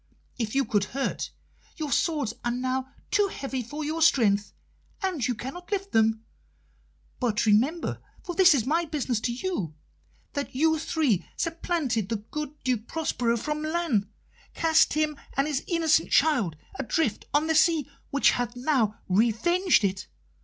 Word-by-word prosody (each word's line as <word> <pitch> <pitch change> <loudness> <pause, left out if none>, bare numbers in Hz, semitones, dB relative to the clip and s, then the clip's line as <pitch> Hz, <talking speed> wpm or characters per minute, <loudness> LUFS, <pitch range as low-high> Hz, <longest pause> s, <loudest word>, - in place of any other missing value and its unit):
If 225 0 -2
you 275 - +3
could 205 -2 +1
hurt, 275 - -2 0.5
your 305 -3 -3
swords 300 - +1
are 240 - 0
now 255 +2 -2 0.2
too 410 -1 +3
heavy 270 -8 -4
for 290 +6 -5
your 320 +2 -2
strength, 210 -10 +3 0.5
and 350 -11 0
you 245 - -1
cannot 310 - -8
lift 395 -1 -2
them. 225 0 +2 0.9
But 230 -4 +1
remember 250 +11 +2 0.2
for 350 - -4
this 350 -3 +6
is 235 -5 0
my 330 +5 +1
business 275 -7 -1
to 235 - -1
you 235 - -3 0.6
that 285 -3 -4
you 320 +3 +3
three 300 - +1
supplanted 320 - -1
the 230 - 0
good 295 +8 -6
Duke 240 -3 -1
Prospero 245 -7 0
from 300 +6 -3
Milan, 310 - 0 0.5
cast 320 -1 +4
him 305 -1 0 0.2
and 275 - +3
his 295 -2 -1
innocent 325 -2 +2
child 245 - +3 0.2
adrift 270 -2 0
on 295 +2 +2
the 320 - +1
sea, 315 -2 +3 0.2
which 280 - +4
hath 245 0 -2
now 245 -5 0
revenged 235 - +3
it. 190 -1 -1
275 Hz, 155 wpm, -27 LUFS, 230-320 Hz, 0.9 s, this